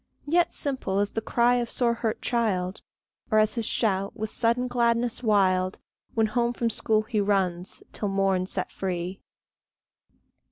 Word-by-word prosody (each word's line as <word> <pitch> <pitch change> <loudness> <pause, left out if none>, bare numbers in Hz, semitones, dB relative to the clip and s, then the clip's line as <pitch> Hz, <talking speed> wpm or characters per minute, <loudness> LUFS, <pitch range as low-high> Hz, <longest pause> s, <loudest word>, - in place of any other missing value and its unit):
Yet 340 +3 +2
simple 260 -9 -2
as 205 0 +1
the 225 - -2
cry 240 +2 +2
of 240 -1 -2
sore 240 -2 +1
hurt 225 -1 -3
child, 200 -6 0 0.5
Or 215 - +3
as 215 0 +4
his 230 -2 -3
shout, 195 -3 0
with 215 0 -4
sudden 235 +2 +1
gladness 235 -1 +1
wild, 190 -4 +2 0.4
When 225 -1 +3
home 235 +2 0
from 235 -1 0
school 215 0 +3
he 215 -1 -1
runs, 190 -3 0
till 210 - -2
morn 195 -2 +1
set 185 -1 -2
free. 185 0 -4
215 Hz, 155 wpm, -26 LUFS, 195-235 Hz, 0.5 s, as